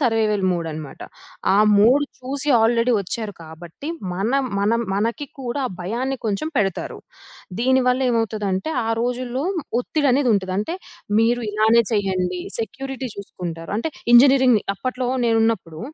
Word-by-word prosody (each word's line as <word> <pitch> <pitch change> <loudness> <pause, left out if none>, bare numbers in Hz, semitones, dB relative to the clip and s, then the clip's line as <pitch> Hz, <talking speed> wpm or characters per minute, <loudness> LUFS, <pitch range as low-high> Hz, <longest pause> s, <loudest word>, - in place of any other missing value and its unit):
Survival 220 -5 +1
mode 170 -2 -2
అన్నమాట. 155 -3 -8 0.5
ఆ - - +4 0.2
mode 255 +8 +5
చూసి 270 +3 -4
ఆల్రెడీ 230 +2 +3
వచ్చారు 205 +2 -4
కాబట్టి 165 - -10 0.2
మనం 230 +10 0 0.2
మనం 215 +4 +2
మనకి 230 +8 -1
కూడా 255 +2 -3
ఆ - - -5
భయాన్ని 240 +9 -2
కొంచెం 220 +8 -1
పెడతారు. 195 -4 -1 0.6
దీని 260 +2 +3
వల్ల 250 +1 +2
ఏమవుతదంటే, 215 -1 -1 0.2
ఆ - - -1
రోజుల్లో 250 +2 -2 0.4
ఒత్తిడి 290 +3 0
అనేది 265 -2 +2
ఉంటది. 190 -2 -1
అంటే 215 +12 -2 0.5
మీరు 240 +2 +2
ఇలానే 220 +2 +4
చేయండి. 185 -3 0 0.2
సెక్యూరిటీ 265 +4 -5
చూసుకుంటారు. 175 -4 -7
అంటే 310 +9 -2 0.2
ఇంజినీరింగ్‌ని 255 -3 +6
అప్పట్లో 255 +3 -3 0.2
నేనున్నప్పుడు, 225 -8 0
225 Hz, 130 wpm, -21 LUFS, 195-255 Hz, 0.6 s, ఇంజినీరింగ్‌ని